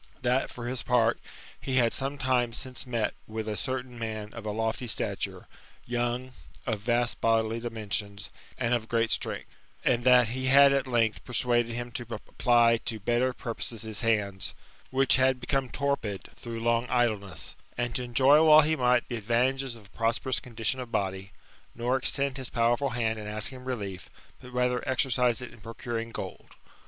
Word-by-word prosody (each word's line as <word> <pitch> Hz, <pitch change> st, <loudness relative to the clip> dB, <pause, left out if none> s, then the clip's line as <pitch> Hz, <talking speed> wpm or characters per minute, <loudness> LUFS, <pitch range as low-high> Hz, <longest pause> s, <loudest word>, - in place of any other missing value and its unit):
That, 125 Hz, +2 st, +2 dB
for 120 Hz, -, -8 dB
his 125 Hz, 0 st, -2 dB
part, 120 Hz, -2 st, +2 dB, 0.4 s
he 130 Hz, -, -3 dB
had 120 Hz, -3 st, +3 dB
some 135 Hz, +1 st, 0 dB
time 125 Hz, -3 st, +1 dB
since 130 Hz, +2 st, -4 dB
met 115 Hz, -3 st, 0 dB
with 110 Hz, 0 st, -4 dB
a 105 Hz, -, -2 dB
certain 125 Hz, 0 st, -4 dB
man 110 Hz, -2 st, -5 dB
of 115 Hz, -2 st, -7 dB
a -, -, -1 dB
lofty 115 Hz, +3 st, -2 dB
stature, 110 Hz, -, -2 dB, 0.4 s
young, 120 Hz, +1 st, -2 dB, 0.3 s
of 110 Hz, -, -1 dB
vast 120 Hz, +2 st, 0 dB
bodily 115 Hz, 0 st, +2 dB
dimensions, 105 Hz, -3 st, -4 dB, 0.3 s
and 120 Hz, -1 st, 0 dB
of 115 Hz, -2 st, 0 dB
great 115 Hz, -1 st, +1 dB
strength^; -, -, -2 dB, 0.4 s
and 120 Hz, -1 st, +2 dB
that 125 Hz, -2 st, +6 dB
he 130 Hz, +2 st, -3 dB
had 140 Hz, +1 st, +7 dB
at 135 Hz, -1 st, +1 dB
length 115 Hz, -3 st, +1 dB
persuaded 120 Hz, -1 st, +1 dB
him 120 Hz, 0 st, -4 dB
to 120 Hz, 0 st, -5 dB
apply 120 Hz, -1 st, +3 dB
to 110 Hz, -1 st, -5 dB
better 120 Hz, +5 st, +1 dB
purposes 115 Hz, -2 st, -5 dB
his 110 Hz, -2 st, -4 dB
hands, 105 Hz, -5 st, 0 dB, 0.3 s
which 135 Hz, 0 st, +3 dB
had 130 Hz, 0 st, +3 dB
become 130 Hz, +1 st, -1 dB
torpid 140 Hz, -9 st, -2 dB
through 115 Hz, -1 st, -6 dB
long 115 Hz, +1 st, +1 dB
idleness; 110 Hz, -6 st, -1 dB, 0.2 s
and 120 Hz, 0 st, -1 dB
to 125 Hz, -, -2 dB
enjoy 135 Hz, +5 st, +5 dB
while 155 Hz, -1 st, +9 dB
he 155 Hz, +1 st, +1 dB
might 125 Hz, -3 st, +2 dB
the 120 Hz, -, -3 dB
advantages 125 Hz, +4 st, 0 dB
of 110 Hz, -3 st, -14 dB
a -, -, -18 dB
prosperous 115 Hz, +3 st, 0 dB
condition 120 Hz, +1 st, -2 dB
of 125 Hz, -2 st, -6 dB
body; 95 Hz, -1 st, -2 dB, 0.4 s
nor 120 Hz, +2 st, 0 dB
extend 135 Hz, +1 st, +2 dB
his 130 Hz, -2 st, -4 dB
powerful 120 Hz, +4 st, +2 dB
hand 115 Hz, -2 st, -1 dB
in 105 Hz, -, -7 dB
asking 110 Hz, +5 st, -3 dB
relief, 100 Hz, -8 st, -5 dB, 0.3 s
but 125 Hz, -, -11 dB
rather 125 Hz, 0 st, +1 dB
exercise 125 Hz, -2 st, +2 dB
it 125 Hz, -, -8 dB
in 110 Hz, -, -16 dB
procuring 115 Hz, +1 st, -5 dB
gold." -, -, -8 dB
120 Hz, 175 wpm, -28 LUFS, 115-130 Hz, 0.4 s, while